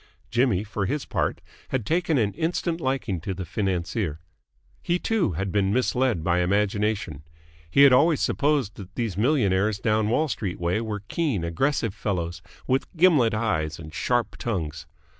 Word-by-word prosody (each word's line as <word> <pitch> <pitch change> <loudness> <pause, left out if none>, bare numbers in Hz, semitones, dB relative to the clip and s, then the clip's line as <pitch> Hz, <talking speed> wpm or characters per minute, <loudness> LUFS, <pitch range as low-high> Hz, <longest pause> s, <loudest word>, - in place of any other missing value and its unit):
Jimmy, 115 -5 +2
for 105 -2 -3
his 145 +1 -2
part, - - -1 0.3
had 130 -5 -1
taken 165 0 +1
an 105 -4 +1
instant 165 0 -1
liking 130 - -1
to 95 +2 -4
the 95 0 -5
financier. 90 -2 -2 0.6
He, 175 - +1
too, 190 - 0
had 95 +4 -2
been 100 -1 +1
misled 125 -5 +1
by 90 +1 +2
imagination. 100 -3 0 0.5
He 140 - +5
had 140 -2 +8
always 150 +3 +4
supposed 140 -7 +1
that 95 -2 -10
these 115 -6 -2
millionaires 105 -4 +2
down 110 +1 +1
Wall 155 +7 +2
Street 100 -9 -3
way 85 +5 0
were 105 -3 -4
keen, 140 - -1
aggressive 110 - 0
fellows, 85 -5 -3 0.2
with 130 +1 0
gimlet 150 - +4
eyes 80 -8 -1
and 75 -1 -10
sharp 120 +7 0
tongues. 80 -9 -3
105 Hz, 160 wpm, -25 LUFS, 90-130 Hz, 0.6 s, had